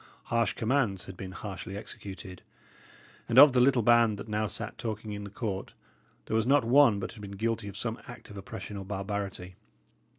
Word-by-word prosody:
Harsh 115 Hz, 0 st, +2 dB
commands 115 Hz, -5 st, 0 dB
had 95 Hz, -, -9 dB
been 95 Hz, +1 st, -7 dB
harshly 95 Hz, 0 st, -6 dB
executed; 95 Hz, -3 st, -9 dB, 0.9 s
and 120 Hz, -, +1 dB
of 140 Hz, 0 st, +10 dB
the 125 Hz, -, +4 dB
little 125 Hz, -1 st, +4 dB
band 115 Hz, -2 st, +5 dB
that 100 Hz, -, -8 dB
now 105 Hz, 0 st, 0 dB
sat 95 Hz, -, -5 dB
talking 110 Hz, -1 st, -4 dB
in 105 Hz, 0 st, -5 dB
the 100 Hz, -, -7 dB
court, 100 Hz, -2 st, -4 dB, 0.5 s
there -, -, -2 dB
was 115 Hz, +1 st, +2 dB
not 140 Hz, -1 st, +5 dB
one 120 Hz, -4 st, +6 dB
but -, -, -4 dB
had 110 Hz, -, -12 dB
been 100 Hz, -1 st, -7 dB
guilty 115 Hz, 0 st, -1 dB
of 100 Hz, 0 st, -7 dB
some 115 Hz, +1 st, -3 dB
act 120 Hz, -, -10 dB
of -, -, -10 dB
oppression 100 Hz, +1 st, -7 dB
or 100 Hz, -, -5 dB
barbarity. 95 Hz, -2 st, -4 dB
105 Hz, 195 wpm, -29 LUFS, 100-115 Hz, 0.9 s, of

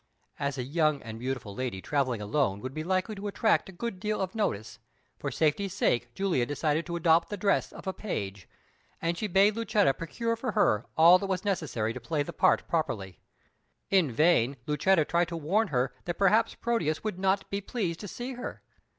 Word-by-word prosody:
As 140 Hz, 0 st, -2 dB
a 125 Hz, -, -2 dB
young 155 Hz, +2 st, +1 dB
and 110 Hz, 0 st, -7 dB
beautiful 125 Hz, -5 st, -4 dB
lady 120 Hz, -3 st, -3 dB
travelling 130 Hz, -2 st, -1 dB
alone 105 Hz, -2 st, 0 dB
would 130 Hz, +2 st, -5 dB
be 155 Hz, -, -4 dB
likely 185 Hz, +5 st, 0 dB
to 205 Hz, 0 st, -5 dB
attract 215 Hz, 0 st, +1 dB
a -, -, -8 dB
good 190 Hz, +1 st, -5 dB
deal 215 Hz, +1 st, -1 dB
of 190 Hz, -1 st, -2 dB
notice, 115 Hz, -, -2 dB, 0.4 s
for -, -, -2 dB
safety's 170 Hz, +5 st, 0 dB
sake 120 Hz, -10 st, +1 dB
Julia 190 Hz, -10 st, +1 dB
decided 150 Hz, +2 st, 0 dB
to 170 Hz, -, -3 dB
adopt 165 Hz, 0 st, +3 dB
the 205 Hz, -, -4 dB
dress 200 Hz, +1 st, +1 dB
of -, -, -11 dB
a 190 Hz, -, -2 dB
page, 100 Hz, -, -5 dB, 0.5 s
and 170 Hz, +1 st, -1 dB
she 215 Hz, -, -2 dB
bade 200 Hz, +2 st, +4 dB
Lucetta 215 Hz, -, +2 dB
procure 230 Hz, -, -2 dB
for 245 Hz, +2 st, -3 dB
her 110 Hz, -, +2 dB
all 170 Hz, +3 st, +8 dB
that 195 Hz, -, -3 dB
was 185 Hz, +1 st, -1 dB
necessary 140 Hz, -, -1 dB
to 130 Hz, -, -7 dB
play 155 Hz, -3 st, -1 dB
the -, -, -7 dB
part -, -, +3 dB
properly. 110 Hz, -, -2 dB, 0.7 s
In 185 Hz, -8 st, +4 dB
vain 140 Hz, -1 st, +3 dB
Lucetta 155 Hz, +2 st, +3 dB
tried 170 Hz, +2 st, +1 dB
to 170 Hz, 0 st, -5 dB
warn 195 Hz, +9 st, +1 dB
her 130 Hz, -5 st, 0 dB
that 175 Hz, -1 st, -3 dB
perhaps 200 Hz, +3 st, +3 dB
Proteus 165 Hz, -10 st, -1 dB
would 215 Hz, -4 st, -3 dB
not 195 Hz, +1 st, +1 dB
be 200 Hz, 0 st, -1 dB
pleased 190 Hz, -6 st, -3 dB
to 205 Hz, -, -7 dB
see 245 Hz, +7 st, -5 dB
her. 250 Hz, 0 st, -7 dB
170 Hz, 200 wpm, -29 LUFS, 135-200 Hz, 0.7 s, all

